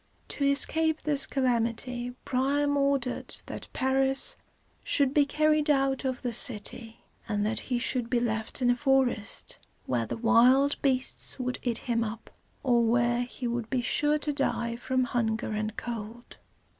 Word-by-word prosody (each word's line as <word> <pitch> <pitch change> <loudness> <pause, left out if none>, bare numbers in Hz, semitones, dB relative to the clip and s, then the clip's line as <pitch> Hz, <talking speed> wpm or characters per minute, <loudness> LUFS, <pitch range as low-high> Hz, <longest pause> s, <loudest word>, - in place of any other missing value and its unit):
To 285 - -3
escape 315 +3 +3
this 290 -2 +1
calamity, 245 -1 -1
Priam 285 +3 +1
ordered 275 -3 -1
that - - -7
Paris 270 0 +1 0.5
should 280 -2 +1
be 290 -1 +3
carried 305 +1 +2
out 270 -2 +1
of 260 -1 -3
the 245 -2 -2
city, 225 0 +1 0.3
and 205 -1 0
that 215 +1 0
he 250 - +1
should 240 -1 -2
be 245 - +2
left 225 +1 -2
in 245 - +4
a - - +2
forest, 265 -6 -1 0.3
where 120 -3 -1
the - - -4
wild 245 +5 +4
beasts 265 -2 +2
would 250 -1 -3
eat 240 -2 -1
him 235 -2 -1
up, 225 0 -7 0.3
or 240 -3 +3
where 240 +1 +2
he 245 +1 -6
would 235 -1 -3
be 255 -2 0
sure 295 +5 +1
to 295 0 -3
die 235 -4 -1
from 255 +2 -1
hunger 225 -3 -1
and 215 0 -3
cold. 235 0 -7
250 Hz, 155 wpm, -28 LUFS, 235-275 Hz, 0.5 s, in